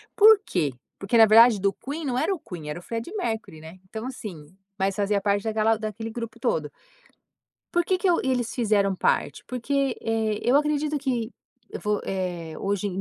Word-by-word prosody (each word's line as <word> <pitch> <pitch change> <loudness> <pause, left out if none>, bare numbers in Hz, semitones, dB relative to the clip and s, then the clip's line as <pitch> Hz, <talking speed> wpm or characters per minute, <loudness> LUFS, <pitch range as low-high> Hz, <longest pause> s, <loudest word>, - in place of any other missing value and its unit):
por 435 0 +8
quê? 150 -8 -1 0.3
Porque, 205 +4 +1
na 225 - +9
verdade, 225 0 +7
do 200 0 +1
Queen 295 +3 -6
não 250 -2 -1
era 345 +8 +1
o 350 - -5
Queen, 170 - -8
era 150 - -4
o - - -13
Freddie 230 +8 -5
Mercury, 220 - -3
né? 160 +4 -12
Então, 220 +2 -6
assim, 185 - -8 0.2
mas 195 0 0
fazia 205 -1 +1
parte 200 0 0
daquela 220 0 +2
daquele 220 +1 -5
grupo 230 -1 -6
todo 155 - -1 1.0
por 345 0 +3
que 370 +1 +1
que 370 0 +1
o 335 - +2
e 265 - 0
eles 245 -3 -1
fizeram 205 -5 +2
parte? - - 0
Porque, 270 +1 -1
eh, 220 -2 -1
eu 250 +3 +3
acredito 300 0 +1
que 250 -4 -2 0.4
eu - - -5
vou, 210 -1 0
eh, 175 -4 -4
hoje 200 0 -1
220 Hz, 195 wpm, -25 LUFS, 195-260 Hz, 1.0 s, na